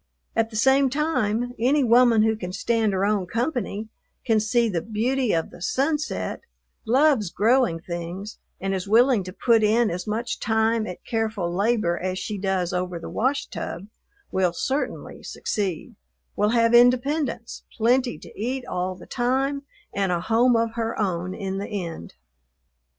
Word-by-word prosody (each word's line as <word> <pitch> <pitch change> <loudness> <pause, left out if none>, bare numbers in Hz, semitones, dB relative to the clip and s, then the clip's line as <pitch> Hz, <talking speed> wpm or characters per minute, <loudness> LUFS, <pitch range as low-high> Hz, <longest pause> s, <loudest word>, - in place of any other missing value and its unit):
At 225 0 +1
the 225 - -11
same 265 +4 +4
time, 245 -5 0
any 270 +5 +3
woman 235 -2 +5
who 220 0 +2
can 180 -4 -6
stand 225 +2 +1
her 190 0 0
own 205 -3 0
company, 230 - -2 0.4
can 225 -3 +3
see 230 +2 +2
the 175 -6 -1
beauty 230 +4 0
of 165 -1 -1
the - - -13
sunset, 295 - -1 0.5
loves 260 - +3
growing 225 -2 +2
things, 175 +4 -6 0.2
and 195 0 -2
is 190 0 -3
willing 235 0 +4
to 185 - -6
put 230 +3 +3
in 220 +1 +3
as 180 +3 -5
much 225 +3 -2
time 220 0 +1
at 180 - -8
careful 220 -6 -2
labor 200 -3 +1
as 185 0 -2
she 205 +2 -4
does 190 -2 -1
over 180 -1 -2
the 165 - -8
washtub, 220 -8 -2 0.5
will 185 -2 +1
certainly 270 +10 -3
succeed; 195 -7 -3 0.4
will 210 - +2
have 230 0 +3
independence, 245 +1 +2
plenty 245 +2 +2
to - - -13
eat 250 +4 -3
all 180 +1 -3
the - - -13
time, 265 +3 0 0.3
and 195 -2 0
a 175 - +1
home 235 +5 +3
of 230 0 +1
her 230 -1 -3
own 185 -2 -1
in 195 -1 -4
the 200 - -4
end. 170 - -6
220 Hz, 160 wpm, -24 LUFS, 190-245 Hz, 0.5 s, woman